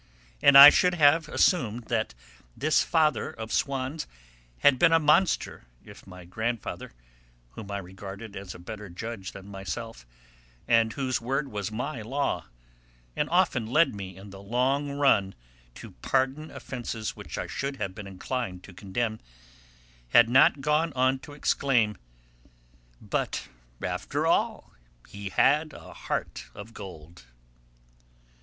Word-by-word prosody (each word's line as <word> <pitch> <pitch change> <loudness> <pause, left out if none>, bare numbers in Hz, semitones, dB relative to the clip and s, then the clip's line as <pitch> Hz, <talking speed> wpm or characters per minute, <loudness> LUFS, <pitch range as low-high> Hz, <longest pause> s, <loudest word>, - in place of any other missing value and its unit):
And 140 -1 +7
I 140 +1 +13
should 180 -1 +2
have 155 0 +4
assumed 120 - +1
that 115 - -1 0.4
this 155 +2 +2
father 155 -7 +1
of 110 0 -8
Swann's 135 +2 -2 0.5
had 135 -3 +5
been 165 - +5
a 165 - +6
monster 160 - +2 0.2
if - - -14
my 90 -1 -12
grandfather, 110 +5 -4 0.6
whom 105 - -10
I 100 - -3
regarded 100 +3 -9
as 95 -2 -8
a - - -9
better 105 +3 -9
judge 95 +2 -6
than 100 -1 -11
myself, 100 - -7 0.6
and 115 -1 +3
whose 130 -2 -2
word 135 +4 -2
was 105 -2 -4
my 125 +3 -4
law 135 +6 -2 0.7
and - - -1
often 115 -2 +2
led 155 +6 +3
me 95 -3 -8
in 100 +1 -12
the 95 0 -11
long 130 +7 0
run 140 -9 +2 0.4
to - - -10
pardon 135 - -1
offences 115 -4 -6
which - - -8
I - - -3
should 140 0 -4
have 100 -7 -4
been 100 0 -9
inclined 95 -1 -5
to 100 - -13
condemn, 110 +4 -3 0.9
had 115 - +6
not 130 +2 +5
gone 150 +3 +1
on 130 +1 +2
to 145 - -12
exclaim, 125 -6 +1 1.0
"But, - - -3 0.3
after - - -2
all, - - 0 0.4
he 100 -1 -7
had 150 +9 +2
a - - -12
heart - - -4
of 110 +3 -10
gold." 80 - -11
115 Hz, 140 wpm, -27 LUFS, 100-140 Hz, 1.0 s, I